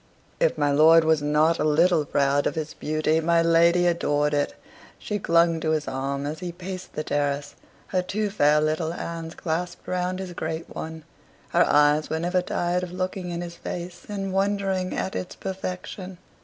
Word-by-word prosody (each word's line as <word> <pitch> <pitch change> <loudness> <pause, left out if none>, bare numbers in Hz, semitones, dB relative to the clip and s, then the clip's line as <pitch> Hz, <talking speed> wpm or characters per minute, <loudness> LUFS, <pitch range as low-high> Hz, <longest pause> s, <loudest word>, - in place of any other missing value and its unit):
If - - +2
my 145 0 +2
lord 160 +3 +6
was 160 -1 +3
not 150 +3 +2
a - - +1
little 160 +1 +3
proud 140 0 +2
of - - -2
his 155 -1 -4
beauty, 155 +1 0
my 165 +1 +3
lady 170 +1 +4
adored 150 -4 +1
it. 145 0 0 0.4
She 210 -2 -3
clung 170 -2 +3
to 160 - -1
his 155 -1 -1
arm 140 +1 -3
as 150 +2 -4
he 180 -1 -4
paced 185 +1 -8
the 155 - -3
terrace, 145 -1 -1 0.4
her 185 - +1
two 205 +3 -2
fair 150 -6 +4
little 155 +2 0
hands 165 -1 -6
clasped 170 +1 -4
round 180 0 -1
his 185 -2 -6
great 160 0 -5
one; 160 0 -6 0.5
her - - +4
eyes 150 +1 +4
were 160 - -1
never 180 +2 +1
tired 175 0 -1
of 180 -1 -5
looking 185 0 -3
in 170 0 -3
his 170 -1 -7
face 175 0 -7
and 195 -2 -3
wondering 195 -1 0
at 190 - -2
its 180 - -4
perfection. 185 0 -6
170 Hz, 185 wpm, -25 LUFS, 155-180 Hz, 0.5 s, lord